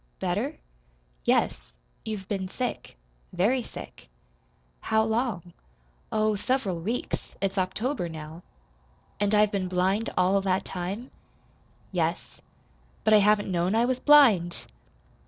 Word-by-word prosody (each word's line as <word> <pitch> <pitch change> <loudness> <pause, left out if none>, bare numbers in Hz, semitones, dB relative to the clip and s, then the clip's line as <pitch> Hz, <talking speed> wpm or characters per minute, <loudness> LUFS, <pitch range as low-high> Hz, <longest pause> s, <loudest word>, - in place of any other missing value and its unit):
"Better?" - - -2 0.7
"Yes. - - +2 0.4
You've 210 -4 -5
been 195 -3 -2
sick 245 - -4 0.3
very 215 +9 +2
sick." 225 - -11 0.7
"How 220 0 +2
long?" 220 -6 -2 0.6
"Oh, 215 0 +2
several 200 -5 -1
weeks. 230 +8 -4
It's 195 0 -1
October 190 +2 -1
now." 160 +1 -8 0.8
"And 205 +1 +2
I've 210 0 +4
been 195 -2 -1
blind 190 +5 +1
all 190 +2 +3
that 190 -1 0
time?" 195 +7 -5 0.8
"Yes." - - -2 0.6
"But 215 - +4
I 210 - +8
haven't 205 -1 +3
known 180 +3 +1
I 230 +1 +3
was 255 0 0
blind!" 235 - +5
200 Hz, 120 wpm, -27 LUFS, 185-220 Hz, 0.8 s, I